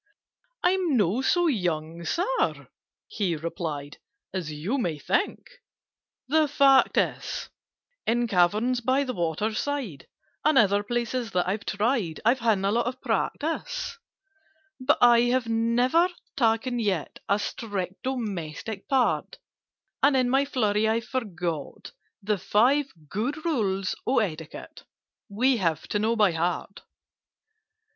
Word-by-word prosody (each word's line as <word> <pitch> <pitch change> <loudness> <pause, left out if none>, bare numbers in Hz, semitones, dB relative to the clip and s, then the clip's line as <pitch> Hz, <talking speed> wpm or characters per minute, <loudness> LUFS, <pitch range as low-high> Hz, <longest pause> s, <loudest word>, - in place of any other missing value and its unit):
"I'm 355 -6 +2
not 215 +6 +1
so 350 +3 +3
young, 170 - -1
Sir," 380 - -1 0.4
he 195 - -1
replied, 155 -2 -5 0.3
"As 175 -5 -3
you 175 - -2
might 160 - -2
think. 395 - 0 0.8
The 310 +2 +3
fact 275 -2 +4
is, - - -1 0.6
In 240 +1 +2
caverns 215 +6 +2
by 260 +4 +2
the 255 -2 -3
water 175 +4 -1
side, 245 - -3 0.4
And 305 -2 +3
other 205 -3 +4
places 240 +2 -2
that 180 0 +1
I've 200 +2 -2
tried, 210 -6 0
I've 245 +3 +4
had 225 -3 +3
a 200 - +2
lot 235 +2 +1
of 255 +1 -4
practice: 470 +9 -2 0.8
"But 260 +3 +3
I 240 -1 +7
have 250 -1 +1
never 240 +9 +2 0.3
taken 240 +1 +1
yet 195 -9 -2
A 200 - +4
strict 200 -3 -4
domestic 210 - -4
part, 265 -2 +1 0.6
And 275 -1 +4
in 250 -1 +2
my 270 +1 +3
flurry 220 -5 +1
I 225 +1 +2
forget 180 - -4 0.3
The 205 -1 0
Five 265 - +2 0.2
Good 250 - -3
Rules 195 - 0
of 265 - +3
Etiquette 160 -5 -7 0.5
We 250 +5 +2
have 165 -7 -1
to 205 - 0
know 220 +2 +1
by 210 -4 +4
heart." 170 +4 -2
225 Hz, 130 wpm, -26 LUFS, 185-260 Hz, 0.8 s, I